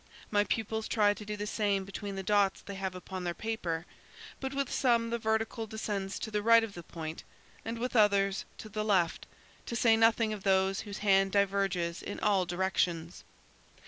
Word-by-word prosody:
My 205 -1 +4
pupils 220 0 -2
try 205 -2 +3
to 210 - -9
do 210 0 -5
the 205 - -3
same 205 -2 0
between 195 +1 -6
the 195 - -4
dots 200 0 +2
they 200 - -7
have 190 -1 -4
upon 185 0 -6
their 175 -1 -2
paper, 175 -7 -3 0.5
but 265 -1 -3
with 275 -1 -2
some 235 -3 +2
the 235 - -1
vertical 220 +1 -1
descends 205 -3 -3
to 220 - -5
the 210 0 0
right 230 +1 +6
of 220 -3 -5
the 175 - -8
point 160 -1 -7 0.4
and 230 +1 -4
with 250 +2 -3
others, 200 -2 +3
to - - -8
the 215 +1 -2
left, 185 -6 +1 0.4
to 235 - -3
say 225 -1 +5
nothing 225 -1 +3
of 210 - -6
those 190 0 +2
whose 205 -1 -6
hand 195 -1 +4
diverges 195 -4 +1
in 205 - -6
all 195 -4 +2
directions. 175 -2 -1
205 Hz, 190 wpm, -31 LUFS, 190-220 Hz, 0.5 s, right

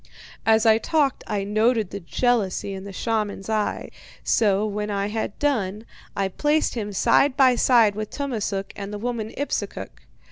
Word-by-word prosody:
As 220 0 +4
I 220 0 +5
talked 290 +1 0
I 205 -2 -1
noted 215 0 +1
the 200 - -5
jealousy 200 0 0
in 190 0 -7
the 200 - -7
shaman's 210 -1 -2
eye, 215 -1 -1 0.3
so 205 -2 +2
when 210 0 -3
I 200 0 -1
had 220 -1 -3
done, 220 -7 -1 0.3
I 195 -1 0
placed 295 +10 +1
him 210 -3 -4
side 275 +7 +3
by 260 -3 +6
side 235 -4 +4
with 215 0 -5
Tummasook 215 -8 -3
and 200 0 -6
the 210 - -4
woman 225 0 -3
Ipsukuk. 285 - -4
215 Hz, 165 wpm, -23 LUFS, 200-245 Hz, 0.3 s, by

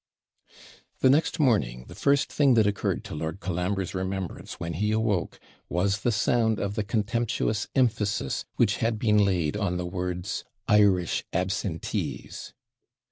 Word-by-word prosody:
The 130 - +6
next 160 +3 +2
morning 105 - +1
the - - -10
first 140 0 +2
thing 140 -4 +4
that 110 -2 +5
occurred 100 -1 -1
to - - -8
Lord 80 +4 -4
Colambre's 90 +1 -2
remembrance 95 -1 -4
when 85 0 -3
he 105 +6 0
awoke 110 -6 0 0.3
was 95 +5 +1
the 120 - +1
sound 110 +1 +2
of 100 0 -2
the 105 0 -1
contemptuous 110 0 -1
emphasis 110 - +1
which - - +2
had 115 -1 0
been 105 -1 +3
laid 90 -5 +1
on 100 -4 -1
the 90 - -3
words 90 +1 -3 0.2
IRISH 100 -5 +3
ABSENTEES! 95 -1 -3
100 Hz, 140 wpm, -27 LUFS, 90-110 Hz, 0.3 s, The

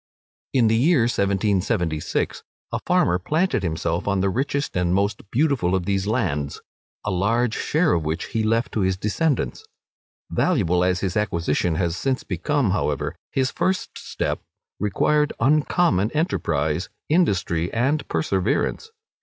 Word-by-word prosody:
In 125 -3 +3
the 110 0 +3
year 135 +4 +4
1776, 100 -6 0 0.3
a - - -1
farmer 90 +1 +3
planted 155 - 0
himself 85 0 -2
on 100 -1 +1
the 95 +1 +1
richest 140 +5 -1
and 90 0 +1
most 100 +2 0
beautiful 125 - +1
of 90 -2 -1
these 100 0 0
lands, 85 - -1 0.5
a - - 0
large 110 +5 +1
share 160 +1 +1
of 85 - +1
which 80 +1 -3
he 115 - +1
left 115 +2 +1
to - - -2
his 95 -1 +1
descendants. 145 - -1 0.7
Valuable 90 - +2
as 90 0 +1
his 95 -3 -2
acquisition 85 -4 0
has 85 0 0
since 130 +6 -1
become, 105 - 0
however, 75 -7 -1 0.2
his 130 -1 0
first 190 0 -1
step - - -3 0.4
required 150 +9 +1
uncommon 145 - +2
enterprise, 85 - 0 0.2
industry, 95 - +1
and 140 +5 0
perseverance. 95 - 0
100 Hz, 135 wpm, -23 LUFS, 90-135 Hz, 0.7 s, year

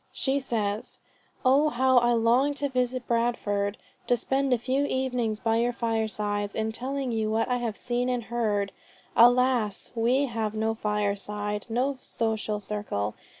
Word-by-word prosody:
She 270 +1 +1
says, 215 -5 -2 0.5
"Oh 280 +4 +5
how 260 -1 +4
I 240 0 +2
long 240 +5 +3
to 285 0 -1
visit 255 -1 -1
Bradford; 210 -4 0 0.3
to 245 - +3
spend 270 +3 0
a 250 - +4
few 260 +4 0
evenings 250 -5 -1
by 225 0 +2
your 240 +1 +1
firesides, 215 -3 -1
in 220 0 -1
telling 260 +2 -3
you 220 -1 0
what 225 +1 +1
I 250 - +1
have 230 -4 -3
seen 245 +1 -1
and 245 -1 -1
heard. 210 -3 -1 0.4
Alas! 245 -3 +4
we 245 +4 +2
have 225 -4 -3
no 220 +1 0
fireside, 210 0 -2
no 260 +4 0
social 220 -2 -2
circle. 200 - -3
230 Hz, 150 wpm, -27 LUFS, 210-250 Hz, 0.5 s, Oh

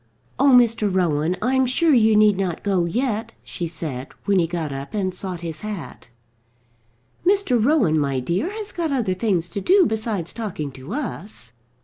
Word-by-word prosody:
"Oh, 280 +2 +5
Mr. 230 -5 +4
Rowan, 170 -2 +1
I'm 260 +2 +2
sure 310 +5 +3
you 220 -3 +5
need 210 -1 +5
not 185 -3 -3
go 190 -4 +1
yet," 230 +3 -2
she 170 - -4
said, 155 -5 -5 0.2
when 200 -2 +3
he 170 - +2
got 165 -3 -3
up 135 +8 -6
and 190 -3 -1
sought 180 -2 -5
his 165 -2 -5
hat. 200 - -7 1.1
"Mr. 360 - +2
Rowan, 225 - +3
my 140 -2 0
dear, 175 - -1
has 420 0 -6
got 330 -3 -2
other 235 -9 0
things 185 -4 0
to 200 - -4
do 375 - +5
besides 215 - -2
talking 185 -11 -4
to 130 +1 -11
us." 205 - -5
200 Hz, 170 wpm, -22 LUFS, 170-245 Hz, 1.1 s, Oh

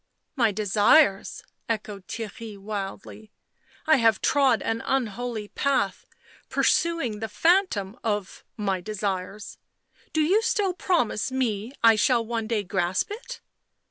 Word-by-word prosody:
" - - -53
My 225 - +4
desires 205 +3 +3
!" - - -34
echoed 210 -4 -4
Theirry 225 -1 -7
wildly. 200 +1 -7 0.3
" - - -42 0.2
I 310 0 +5
have 225 -3 +3
trod 270 -6 +3
an 225 0 -1
unholy 235 -3 -2
path, 280 0 -1 0.4
pursuing 330 -11 +1
the 220 - -3
phantom 250 - +1
of 205 -4 -3
— - - -51
my 195 -4 -1
desires? 200 0 -4 0.5
Do 315 - +1
you 375 +8 +3
still 420 -5 +1
promise 260 - 0
me 240 -3 -2
I 225 -1 +7
shall 235 +1 +2
one 225 -1 -3
day 220 -3 0
grasp 180 - -1
it?" 475 +3 -8
225 Hz, 140 wpm, -25 LUFS, 205-270 Hz, 0.5 s, I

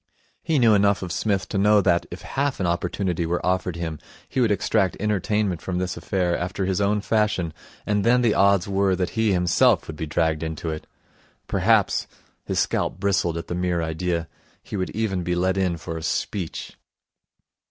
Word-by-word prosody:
He 160 - 0
knew 115 -4 +5
enough 100 -1 +3
of 90 - -5
Psmith 95 0 0
to 100 - -1
know 105 +1 +5
that, 90 -3 +2
if - - -9
half 140 0 -1
an 95 - 0
opportunity 85 +1 -1
were 85 +1 -1
offered 90 -1 0
him, 80 -3 -4 0.3
he 130 - -1
would 115 - +3
extract 100 -1 +1
entertainment 105 -3 0
from 90 -1 -3
this 90 0 -2
affair 90 -3 0
after 90 +2 -2
his 95 +1 0
own 105 +1 +2
fashion; 105 -7 0 0.3
and 105 -1 +1
then 125 +2 +4
the 115 -3 +3
odds 100 -1 +3
were 95 -1 +2
that 90 0 -2
he 110 -2 +1
himself 90 -3 +3
would 80 - -7
be 80 - -4
dragged 80 +1 0
into 80 0 -3
it. 80 - -7 0.6
Perhaps - - +2 0.4
his - - -2
scalp - - 0
bristled 95 -4 +1
at 85 - -5
the - - -5
mere 90 -1 0
idea 85 +1 -2 0.4
he - - -7
would 95 -2 -1
even 105 -4 -1
be 90 0 -1
let 95 +2 +1
in 95 -3 0
for 80 +1 -6
a - - -6
speech. 90 +1 -3
95 Hz, 190 wpm, -24 LUFS, 85-105 Hz, 0.6 s, knew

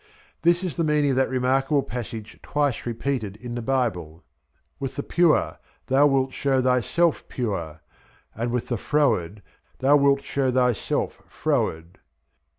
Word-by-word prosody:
This 170 +2 +3
is 180 -3 -4
the 170 - +1
meaning 150 -2 +2
of 130 - 0
that 130 - +2
remarkable 135 +2 +1
passage 115 -4 -7
twice 145 -5 -1
repeated 115 -3 -2
in 120 +2 -8
the 120 - -3
Bible, 110 -11 -2 0.6
"With, 135 - -4
the 140 - -3
pure 175 -3 +2 0.3
thou 135 +2 +4
wilt 135 -2 +1
show 135 -2 +1
thyself 130 +6 +2
pure, 85 - -4 0.5
and 115 +2 -3
with 125 -1 -2
the 120 - 0
froward 105 - 0 0.3
thou 140 +3 +4
wilt 140 -1 +3
show 135 -2 0
thyself 125 -3 0
froward." 85 +3 -2
130 Hz, 145 wpm, -24 LUFS, 115-140 Hz, 0.6 s, thou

